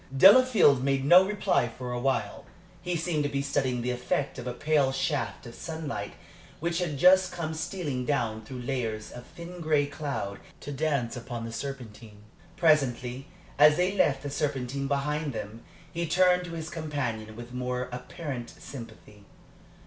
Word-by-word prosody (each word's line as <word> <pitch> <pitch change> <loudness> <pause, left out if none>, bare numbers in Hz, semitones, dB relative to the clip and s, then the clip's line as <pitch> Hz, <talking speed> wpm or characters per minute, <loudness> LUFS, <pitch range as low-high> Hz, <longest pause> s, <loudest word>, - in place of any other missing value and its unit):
Delafield 195 - +7
made 135 -1 +1
no 175 +5 +8
reply 195 -10 +1
for 125 +1 -7
a 120 - -2
while. 120 -5 -1 0.4
He 175 0 -2
seemed 165 -2 0
to 145 - 0
be 140 -1 -1
studying 130 -3 0
the 125 - 0
effect 125 +3 -2
of 125 - -6
a 125 - -2
pale 145 -1 +2
shaft 135 -1 -2
of 120 - -9
sunlight 160 -1 -5 0.5
which 170 +2 -1
had 165 -5 -2
just 185 +4 +6
come 170 -3 -4
stealing 155 -5 -3
down 115 -6 -1
through 125 +2 -7
layers 115 -4 -3
of 120 0 -10
thin 175 +1 -10
gray 155 -3 +2
cloud 140 -8 -4 0.2
to 145 - -6
dance 140 -4 -1
upon 120 -1 -6
the 115 - -6
Serpentine. 115 -5 -7 0.3
Presently, 135 -6 +2 0.3
as 150 0 +7
they 180 +2 +2
left 145 -8 +2
the 145 - -4
Serpentine 140 -2 -2
behind 145 +1 -1
them, 110 +1 -6 0.3
he 170 0 -2
turned 180 +2 +4
to 170 - -7
his 160 -1 -5
companion 130 -9 -3
with 120 +1 -9
more 125 0 -2
apparent 125 0 -6
sympathy. 110 -5 -11
140 Hz, 165 wpm, -28 LUFS, 125-160 Hz, 0.5 s, no